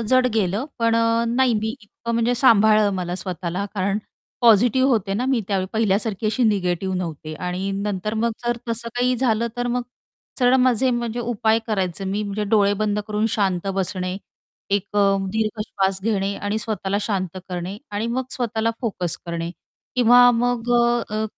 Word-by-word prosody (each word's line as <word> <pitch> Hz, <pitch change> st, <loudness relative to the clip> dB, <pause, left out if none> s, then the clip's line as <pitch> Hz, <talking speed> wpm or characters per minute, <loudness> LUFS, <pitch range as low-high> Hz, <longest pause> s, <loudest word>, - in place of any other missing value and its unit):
जड 255 Hz, -1 st, +4 dB
गेलं, 205 Hz, +3 st, 0 dB
पण 230 Hz, -1 st, +2 dB
अ, 230 Hz, 0 st, +2 dB
नाही 245 Hz, 0 st, +2 dB
मी 220 Hz, +1 st, -1 dB
इतकं 235 Hz, +3 st, -7 dB
म्हणजे 235 Hz, +1 st, +2 dB
सांभाळलं 215 Hz, -4 st, +5 dB
मला 180 Hz, -1 st, -3 dB
स्वतःला. 185 Hz, 0 st, -4 dB
कारण 200 Hz, +1 st, 0 dB, 0.4 s
पॉझिटिव्ह 245 Hz, +3 st, +5 dB
होते 200 Hz, -5 st, +1 dB
ना 240 Hz, -, -1 dB
मी 260 Hz, -3 st, +2 dB
त्यावेळी, 190 Hz, -2 st, 0 dB
पहिल्यासारखी 215 Hz, 0 st, 0 dB
अशी 220 Hz, +4 st, 0 dB
निगेटिव्ह 190 Hz, -3 st, 0 dB
नव्हते 160 Hz, -3 st, -5 dB
आणि 180 Hz, +3 st, -3 dB
नंतर 200 Hz, +1 st, -2 dB
मग 230 Hz, +1 st, +1 dB
जर 240 Hz, 0 st, 0 dB
तसं 230 Hz, +1 st, -3 dB
काही 250 Hz, +1 st, +2 dB
झालं, 235 Hz, -2 st, +1 dB
तर 245 Hz, 0 st, -1 dB
मग 245 Hz, +1 st, 0 dB, 0.6 s
सरळ 250 Hz, -1 st, +4 dB
माझे 255 Hz, 0 st, +3 dB
म्हणजे 240 Hz, -1 st, -2 dB
उपाय 225 Hz, -2 st, +1 dB
करायचं 195 Hz, -4 st, -2 dB
मी 205 Hz, +2 st, -1 dB
म्हणजे 210 Hz, +1 st, -3 dB
डोळे 205 Hz, -2 st, +4 dB
बंद 210 Hz, -1 st, 0 dB
करून 215 Hz, 0 st, 0 dB
शांत 195 Hz, -4 st, 0 dB
बसणे, 185 Hz, -1 st, -2 dB, 0.5 s
एक 200 Hz, +1 st, -1 dB
अ, 200 Hz, -1 st, +4 dB
दीर्घ 215 Hz, +1 st, -1 dB
श्वास 195 Hz, -2 st, -1 dB
घेणे 200 Hz, -2 st, 0 dB
आणि 205 Hz, +2 st, -2 dB
स्वतःला 205 Hz, -3 st, -2 dB
शांत 190 Hz, -4 st, -2 dB
करणे 180 Hz, +2 st, -4 dB
आणि 210 Hz, +2 st, -2 dB
मग 255 Hz, +2 st, -1 dB
स्वतःला 230 Hz, -3 st, -1 dB
फोकस 185 Hz, -8 st, -2 dB
करणे. 170 Hz, 0 st, -3 dB, 0.5 s
किंवा 245 Hz, 0 st, +7 dB
मग 245 Hz, 0 st, 0 dB, 0.4 s
अ, 215 Hz, +1 st, -1 dB
215 Hz, 165 wpm, -22 LUFS, 195-235 Hz, 0.6 s, किंवा